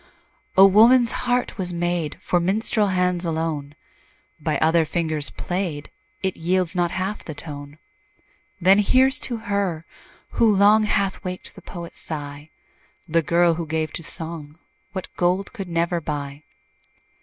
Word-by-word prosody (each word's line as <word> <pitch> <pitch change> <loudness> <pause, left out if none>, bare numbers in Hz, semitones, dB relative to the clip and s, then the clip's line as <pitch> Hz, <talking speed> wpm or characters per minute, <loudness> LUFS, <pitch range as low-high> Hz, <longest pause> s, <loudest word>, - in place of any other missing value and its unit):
Oh! 195 - +10
woman's 230 +5 +6
heart 245 -3 -1
was 180 -1 -1
made 175 -2 -2
For 175 - +1
minstrel 205 +4 +1
hands 180 -2 0
alone; 160 -3 -3 0.6
By - - -1
other 160 +1 +3
fingers 155 -2 -2
played, 175 -5 -4 0.3
It 190 -1 0
yields 180 +1 0
not 175 -1 +1
half 190 +4 -3
the 155 - -7
tone. 145 -1 -9 0.8
Then 190 +3 +5
here's 260 +6 +3
to 240 - -1
her, 200 -7 -2 0.5
who 225 -3 +3
long 210 +2 +5
Hath 200 -1 0
waked 180 -1 -6
the - - -13
poet's 170 -2 -8
sigh, 145 -1 -7 0.6
The 165 0 +2
girl 170 +2 +3
who 165 0 -4
gave 155 0 -2
to - - -5
song 160 -2 -5 0.3
What 190 -2 -7
gold 180 +2 0
could 195 -6 -6
never 170 0 0
buy. 145 -1 -5
175 Hz, 145 wpm, -23 LUFS, 160-195 Hz, 0.8 s, Oh